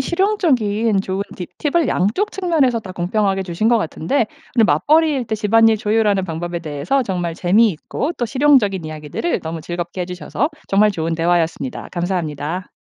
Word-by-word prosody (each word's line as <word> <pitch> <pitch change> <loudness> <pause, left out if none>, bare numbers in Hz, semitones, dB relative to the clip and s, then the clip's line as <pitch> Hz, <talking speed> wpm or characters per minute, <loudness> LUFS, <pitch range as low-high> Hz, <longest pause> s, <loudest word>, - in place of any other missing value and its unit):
실용적인 260 - +1
좋은 190 +1 -2
팁 180 - -6
팁을 310 -1 +1
양쪽 225 - 0
측면에서 320 -11 +1
다 190 -4 -9
공평하게 195 +2 0
주신 185 +4 -1
것 235 -1 +4
같은데 215 - -1 0.3
오늘 230 - +6
맞벌이일 300 -2 +2
때 220 - -1
집안일 225 +1 +4
조율하는 210 -2 +1
방법에 170 0 -4
대해서 155 - -1
정말 175 -6 -3
재미있고 210 - +1
또 240 - -1
실용적인 230 - +3
이야기들을 155 - -3
너무 160 0 -5
즐겁게 175 +2 -4
해 - - -2
주셔서 185 - -2 0.2
정말 210 +2 +4
좋은 165 -2 -2
대화였습니다. 165 -5 -1
감사합니다. 175 -1 -3
200 Hz, 405 characters per minute, -19 LUFS, 175-240 Hz, 0.3 s, 오늘